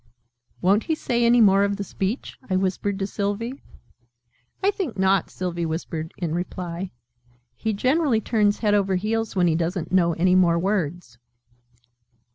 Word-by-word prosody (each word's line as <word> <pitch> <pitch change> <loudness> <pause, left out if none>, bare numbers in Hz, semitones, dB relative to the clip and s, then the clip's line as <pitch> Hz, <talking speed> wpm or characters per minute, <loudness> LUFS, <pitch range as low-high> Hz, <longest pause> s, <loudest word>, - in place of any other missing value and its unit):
"Won't 200 +4 +3
he 320 - 0
say 240 -5 -1
any 235 0 +5
more 200 -2 +5
of 200 0 0
the 200 - -3
speech?" 195 +5 -4
I 185 - +1
whispered 195 +1 -1
to 195 - -1
Sylvie. 205 +7 -3 1.0
"I 400 - +4
think 350 - -4
not," 190 -1 +2
Sylvie 175 -2 -3
whispered 160 0 -4
in 170 -4 -2
reply. 175 +1 -4 0.7
"He 220 - -2
generally 255 +3 +2
turns 210 -2 +1
head 210 -2 +1
over 195 -2 +2
heels 220 +3 -1
when 180 -2 +3
he 170 - +3
doesn't 170 +1 -2
know 175 -2 +3
any 180 +3 +2
more 175 -2 +4
words." 175 -8 -2
195 Hz, 155 wpm, -24 LUFS, 175-215 Hz, 1.0 s, any